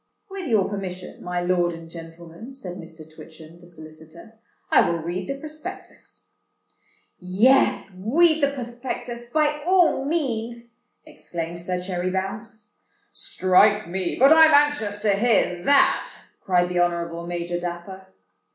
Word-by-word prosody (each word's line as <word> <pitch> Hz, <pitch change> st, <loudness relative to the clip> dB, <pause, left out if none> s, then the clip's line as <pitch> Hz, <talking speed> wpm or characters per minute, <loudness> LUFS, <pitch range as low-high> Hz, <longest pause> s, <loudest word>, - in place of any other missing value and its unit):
"With 385 Hz, -3 st, -6 dB
your 215 Hz, -6 st, +2 dB
permission, 185 Hz, -3 st, -7 dB
my 180 Hz, 0 st, -3 dB
lord 175 Hz, -1 st, +1 dB
and 165 Hz, 0 st, -10 dB
gentlemen," 165 Hz, +8 st, -11 dB
said 185 Hz, -9 st, -8 dB
Mr. 160 Hz, -2 st, -11 dB
Twitchem, 160 Hz, +1 st, -14 dB
the 175 Hz, -, -17 dB
solicitor, 160 Hz, +5 st, -14 dB, 0.3 s
"I -, -, +6 dB
will 170 Hz, -, 0 dB
read 175 Hz, +3 st, -5 dB
the 275 Hz, -, -2 dB
Prospectus." 310 Hz, +6 st, -10 dB, 0.9 s
"Yeth, 195 Hz, +3 st, +2 dB
wead 310 Hz, -, +2 dB
the 280 Hz, -, +4 dB
pwothpeckthuth, 240 Hz, -2 st, -6 dB
by 300 Hz, 0 st, +1 dB
all 355 Hz, -5 st, +3 dB
meanth," 235 Hz, -6 st, -3 dB, 0.4 s
exclaimed 170 Hz, 0 st, -7 dB
Sir 180 Hz, +1 st, -3 dB
Cherry 180 Hz, 0 st, -3 dB
Bounce. 210 Hz, +3 st, -6 dB, 0.4 s
"Strike 200 Hz, +3 st, +2 dB
me—but 190 Hz, -, +3 dB
I'm 320 Hz, -1 st, +7 dB
anxious 290 Hz, -9 st, +2 dB
to 210 Hz, -1 st, +2 dB
hear 195 Hz, -5 st, +1 dB
that," 280 Hz, -1 st, +3 dB, 0.3 s
cried 180 Hz, -1 st, +2 dB
the 180 Hz, 0 st, -1 dB
Honourable 170 Hz, -1 st, -1 dB
Major 175 Hz, 0 st, -3 dB
Dapper. 180 Hz, +2 st, -7 dB
190 Hz, 130 wpm, -23 LUFS, 175-245 Hz, 0.9 s, I'm